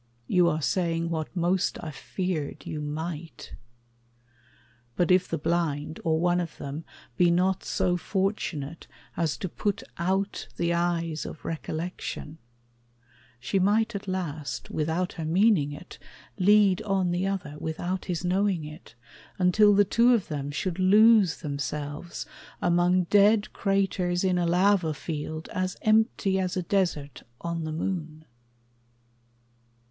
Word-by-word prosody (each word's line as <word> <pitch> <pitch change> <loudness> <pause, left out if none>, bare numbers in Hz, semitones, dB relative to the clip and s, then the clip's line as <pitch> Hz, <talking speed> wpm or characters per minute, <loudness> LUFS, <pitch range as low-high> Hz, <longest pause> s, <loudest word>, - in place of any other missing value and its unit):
You 180 +5 +3
are 155 -2 -2
saying 170 -1 0
What 160 +1 -3
most 175 +1 +1
I 160 - -5
feared 170 +1 -4
you 150 - -4
might. 160 +2 -6 1.4
But 175 0 +2
if 180 0 +4
the 165 - -2
blind, 155 -1 -1
Or 160 -1 +1
one 175 +1 +2
of 170 -3 -4
them, 145 +3 -6 0.3
be 175 - +5
not 180 +2 +2
so 180 -1 0
fortunate 175 -5 -2 0.3
As 165 -4 0
to 185 - -3
put 200 +3 -2 0.2
out 190 +3 -1
the 170 0 +1
eyes 170 -2 -1
of - - -9
recollection, 160 -1 -5 1.0
She 130 +10 0
might 220 +4 +2
at 200 0 -6
last, 160 -6 -4
without 160 +4 -1
her 165 - -5
meaning 170 -2 +3
it, 145 +5 -10 0.4
Lead 205 0 +5
on 195 -4 0
the 180 +2 0
other, 180 -7 -4
without 175 +4 -3
his 180 -1 -3
knowing 185 -2 +1
it, 150 -4 -11 0.4
Until 200 +3 +5
the 205 0 +5
two 240 +4 +4
of 210 - -2
them 145 -2 -3
should 170 +5 -3
lose 210 0 +5
themselves 145 +3 -4 0.3
Among 175 +1 +3
dead 205 +3 +4
craters 195 -2 0
in 185 -1 +2
a 175 - +1
lava 180 -2 +3
field 155 +1 -5
As 185 0 -2
empty 215 -3 +2
as 185 -1 -1
a 180 - -1
desert 170 -7 -1 0.2
on 170 -1 -3
the 155 - -3
moon. 160 -2 -4
175 Hz, 135 wpm, -27 LUFS, 160-190 Hz, 1.4 s, be